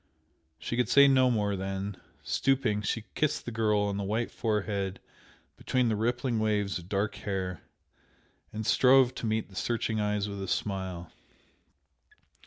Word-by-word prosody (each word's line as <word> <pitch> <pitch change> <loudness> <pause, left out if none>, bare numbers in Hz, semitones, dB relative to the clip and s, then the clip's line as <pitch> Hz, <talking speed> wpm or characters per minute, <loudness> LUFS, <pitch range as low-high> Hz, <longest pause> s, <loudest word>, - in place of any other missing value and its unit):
She - - -4
could 125 -4 +1
say 140 0 +7
no 130 -2 +5
more 105 -4 0
then, 95 +1 -4 0.3
stooping, 130 -6 +1
she 105 +2 -2
kissed 155 - 0
the 120 - -4
girl 110 -2 +1
on 100 -1 -1
the 100 - -2
white 110 +4 -1
forehead 100 -3 -2 0.6
between 125 -2 +1
the 110 - +1
rippling 120 +2 0
waves 105 -3 0
of 90 +1 -13
dark 100 +1 0
hair, 95 -5 -3 0.9
and 110 0 -5
strove 130 +3 +5
to 115 - -4
meet 110 0 -1
the 95 - -15
searching 110 0 -1
eyes 105 0 0
with 100 -1 -6
a 95 - -4
smile. 95 -4 -3
105 Hz, 155 wpm, -29 LUFS, 100-120 Hz, 0.9 s, say